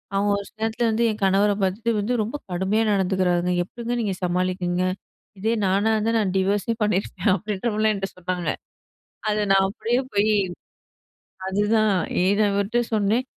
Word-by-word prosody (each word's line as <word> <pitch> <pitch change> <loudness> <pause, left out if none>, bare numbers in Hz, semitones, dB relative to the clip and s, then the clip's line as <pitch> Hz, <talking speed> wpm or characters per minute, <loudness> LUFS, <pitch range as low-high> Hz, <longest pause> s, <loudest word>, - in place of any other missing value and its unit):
அவுங்க, 205 +1 +2
ஒரு 200 - -8
சில 220 - -35
நேரத்தில 225 +1 0
வந்து 230 +2 +1
என் 215 - -7
கணவர 195 +2 +3
பார்த்துட்டு 205 +5 0
வந்து 215 +5 -1
ரொம்ப 225 +6 -5 0.2
கடுமையா 190 +5 +1
நடந்துக்கிறாருங்க. 180 -2 +1
எப்பிடிங்க 235 +6 -5
நீங்க 205 -4 -1
சமாளிக்குறீங்க? 180 0 0 0.6
இதே 220 +4 +1
நானா 200 +4 +2
இருந்தா. 220 +1 +1
நான் 200 -4 0
டிவர்ஸே 200 +4 +1
பண்ணியிருப்பேன். 210 +1 0
அப்பிடின்றமாரிலாம் 215 +2 0
என்ட்ட 195 -1 -3
சொன்னாங்க 180 -2 -3 0.8
அத 210 0 +1
நான் 195 0 +5
அப்பிடியே 235 +4 -1
போய் 205 +1 +3 1.2
அதுதான் 210 +2 +2 0.3
ஏன் 200 +3 +3
அவர்ட்ட 200 +4 0
சொன்னேன். 215 +4 +2
205 Hz, 145 wpm, -23 LUFS, 190-220 Hz, 1.2 s, நான்